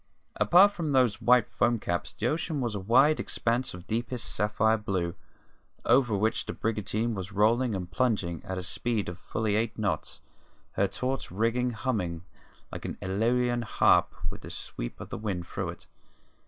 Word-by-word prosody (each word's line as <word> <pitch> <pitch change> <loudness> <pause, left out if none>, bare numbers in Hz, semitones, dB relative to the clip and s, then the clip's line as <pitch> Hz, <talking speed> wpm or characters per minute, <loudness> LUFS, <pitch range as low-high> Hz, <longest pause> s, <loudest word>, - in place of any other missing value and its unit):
Apart 180 - +6
from 165 -7 -3
those 125 -5 +3
white 125 -2 +5
foam 120 -1 +1
caps 85 -5 -3
the 110 - -5
ocean 155 +3 -1
was 120 -4 -1
a 105 - -3
wide 130 +10 +4
expanse 120 +2 0
of 90 0 -11
deepest 120 +4 -2
sapphire 110 +1 +2
blue, 95 -6 -2 0.7
over 120 -4 +4
which 110 +3 0
the - - -3
brigantine 110 +1 -1
was 95 -2 -5
rolling 110 +3 +2
and 90 -2 -5
plunging 85 - 0
at 95 - -5
a 90 - -3
speed 110 +3 -1
of 90 0 -8
fully 110 +2 -1
eight 115 +1 -1
knots, 105 -3 -2 0.5
her 100 - +1
taut 130 +6 -3
rigging 115 +6 0
humming 105 -8 -2 0.5
like - - -7
an - - -5
Aeolian 120 +5 +1
harp 110 - +3 0.2
with - - -9
the - - -9
sweep - - -6
of - - -8
the - - -5
wind 95 -5 -3
through - - -4
it. - - -9
110 Hz, 170 wpm, -28 LUFS, 100-125 Hz, 0.7 s, Apart